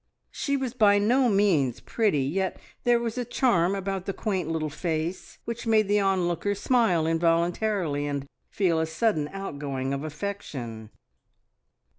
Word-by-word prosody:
She 280 Hz, -1 st, -1 dB
was 260 Hz, -3 st, -3 dB
by 210 Hz, -5 st, +5 dB
no 245 Hz, +5 st, +3 dB
means 180 Hz, -, +2 dB
pretty, 205 Hz, -, +1 dB
yet 185 Hz, +7 st, -1 dB, 0.3 s
there 240 Hz, -1 st, +4 dB
was 235 Hz, +1 st, -3 dB
a -, -, 0 dB
charm 225 Hz, -7 st, +2 dB
about 195 Hz, -1 st, -3 dB
the 195 Hz, -, -1 dB
quaint 190 Hz, -7 st, -2 dB
little 155 Hz, -2 st, -2 dB
face 165 Hz, +2 st, -3 dB
which 235 Hz, 0 st, -5 dB
made 215 Hz, -2 st, +4 dB
the 205 Hz, +1 st, +3 dB
onlooker 195 Hz, 0 st, +1 dB
smile 200 Hz, -8 st, +2 dB
involuntarily 165 Hz, -1 st, +1 dB
and 140 Hz, -1 st, -3 dB, 0.2 s
feel 175 Hz, -5 st, +1 dB
a 160 Hz, -, 0 dB
sudden 160 Hz, -2 st, 0 dB
outgoing 140 Hz, -8 st, -4 dB
of 140 Hz, +1 st, -3 dB
affection. 145 Hz, -, -6 dB
185 Hz, 145 wpm, -26 LUFS, 155-215 Hz, 0.3 s, by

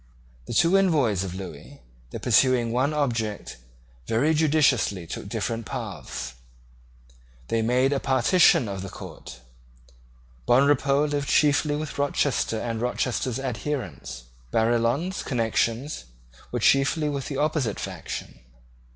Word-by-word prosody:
The -, -, -4 dB
two 170 Hz, +6 st, +4 dB
envoys 140 Hz, -, +2 dB
of 90 Hz, -2 st, -5 dB
Lewis, 90 Hz, -6 st, -9 dB, 0.3 s
though -, -, -6 dB
pursuing 125 Hz, -3 st, +3 dB
one 130 Hz, +5 st, +1 dB
object, 115 Hz, -, -2 dB, 0.5 s
very 140 Hz, +8 st, +2 dB
judiciously 150 Hz, -, +2 dB
took -, -, -7 dB
different 115 Hz, -1 st, -3 dB
paths. 65 Hz, -2 st, -6 dB, 1.2 s
They 115 Hz, -, +1 dB
made 125 Hz, +4 st, +2 dB
a 140 Hz, -, 0 dB
partition 130 Hz, -, +4 dB
of 100 Hz, -2 st, -4 dB
the 95 Hz, -, -6 dB
court. 65 Hz, -7 st, -10 dB, 1.1 s
Bonrepaux 140 Hz, +2 st, +4 dB
lived 145 Hz, -1 st, -2 dB
chiefly 145 Hz, 0 st, +3 dB
with 150 Hz, -1 st, -5 dB
Rochester 140 Hz, -4 st, 0 dB
and 115 Hz, -1 st, -3 dB
Rochester's 125 Hz, 0 st, -1 dB
adherents. 130 Hz, -, -4 dB, 0.3 s
Barillon's 120 Hz, -, +1 dB
connections 115 Hz, -, -1 dB, 0.5 s
were -, -, -1 dB
chiefly 140 Hz, +3 st, +3 dB
with 140 Hz, -2 st, -3 dB
the 140 Hz, -, -4 dB
opposite 145 Hz, -6 st, 0 dB
faction. -, -, -6 dB
130 Hz, 115 wpm, -25 LUFS, 115-145 Hz, 1.2 s, two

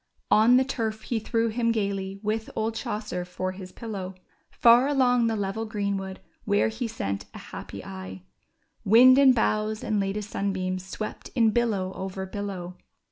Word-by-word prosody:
On 230 Hz, +4 st, +6 dB
the 260 Hz, -, +4 dB
turf 220 Hz, -5 st, -3 dB
he 235 Hz, -, -1 dB
threw 225 Hz, +1 st, 0 dB
him 230 Hz, +1 st, +1 dB
gayly 195 Hz, -3 st, -2 dB
with 220 Hz, +1 st, -2 dB
old 220 Hz, +1 st, -1 dB
Chaucer 210 Hz, -4 st, -4 dB
for 185 Hz, +1 st, -4 dB
his 185 Hz, -1 st, -9 dB
pillow; 195 Hz, -5 st, -6 dB, 0.3 s
Far 240 Hz, +3 st, +5 dB
along 250 Hz, -4 st, +3 dB
the 225 Hz, -, 0 dB
level 205 Hz, +2 st, -2 dB
greenwood 200 Hz, -3 st, -3 dB, 0.2 s
where 205 Hz, +1 st, +2 dB
he 230 Hz, +2 st, -3 dB
sent 100 Hz, -, -4 dB
a -, -, -11 dB
happy -, -, -7 dB
eye 95 Hz, -1 st, -8 dB, 0.6 s
Wind 255 Hz, +6 st, +7 dB
and 265 Hz, -2 st, +7 dB
boughs 215 Hz, -1 st, 0 dB
and 215 Hz, -1 st, 0 dB
latest 200 Hz, +2 st, -3 dB
sunbeams 185 Hz, -2 st, -2 dB
swept 215 Hz, +3 st, -6 dB
in 230 Hz, -3 st, +4 dB
billow 205 Hz, -5 st, 0 dB
over 190 Hz, 0 st, -5 dB
billow. 190 Hz, -2 st, -6 dB
210 Hz, 160 wpm, -26 LUFS, 190-230 Hz, 0.6 s, Wind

